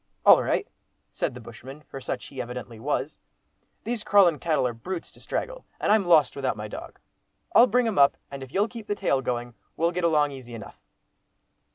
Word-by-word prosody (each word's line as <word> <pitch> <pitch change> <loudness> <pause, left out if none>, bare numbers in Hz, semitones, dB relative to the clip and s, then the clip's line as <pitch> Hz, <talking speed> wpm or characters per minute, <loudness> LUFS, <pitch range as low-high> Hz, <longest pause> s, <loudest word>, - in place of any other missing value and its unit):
"All - - +8
right," - - 0 0.4
said - - -2
the - - -8
bushman, 135 +4 -11
for 135 -2 -10
such - - -4
he 135 - -6
evidently 120 -2 -7
was; 145 +3 -2 0.6
"these 235 -2 -3
crawlin' 185 -6 +5
cattle 160 -6 +1
are 120 - -1
brutes 170 +10 -6
to - - -18
straggle, - - -4 0.2
and - - +1
I'm 215 -2 +4
lost 160 -4 +5
without 130 -5 -2
my 105 0 -5
dog. - - -9 0.6
I'll 240 - +8
bring 245 +2 +2
'em 220 -8 0
up, 140 0 +5
and 140 -1 -7
if 130 -1 -9
you'll 200 +6 +2
keep 230 -2 -10
the 205 - -1
tail 135 -8 +1
going, 120 -1 -3 0.2
we'll 170 +1 +2
get 180 0 -3
along 150 -3 +3
easy 125 -3 -9
enough." 110 - -11
150 Hz, 200 wpm, -26 LUFS, 125-195 Hz, 0.6 s, All